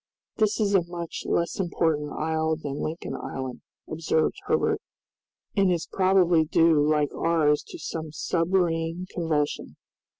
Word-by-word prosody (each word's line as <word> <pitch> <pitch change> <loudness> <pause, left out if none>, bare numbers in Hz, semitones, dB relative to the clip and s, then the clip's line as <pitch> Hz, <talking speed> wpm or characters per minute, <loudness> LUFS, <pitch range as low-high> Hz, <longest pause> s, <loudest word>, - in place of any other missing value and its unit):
"This 215 0 +2
is 205 -2 +1
a 195 - +5
much 170 -1 -6
less 170 +3 0
important 160 -5 0
isle 160 0 0
than 145 -3 -5
Lincoln 160 +2 -4
Island," 130 -2 -5 0.3
observed 160 0 0
Herbert, - - +1 0.7
"and 195 -3 +3
is 170 -2 0
probably 185 -3 +4
due 160 0 +4
like 150 -1 +1
ours 155 -3 +2
to - - -8
some 160 -2 -5
submarine 165 +1 0
convulsion." 155 -4 -1
165 Hz, 130 wpm, -26 LUFS, 155-175 Hz, 0.7 s, a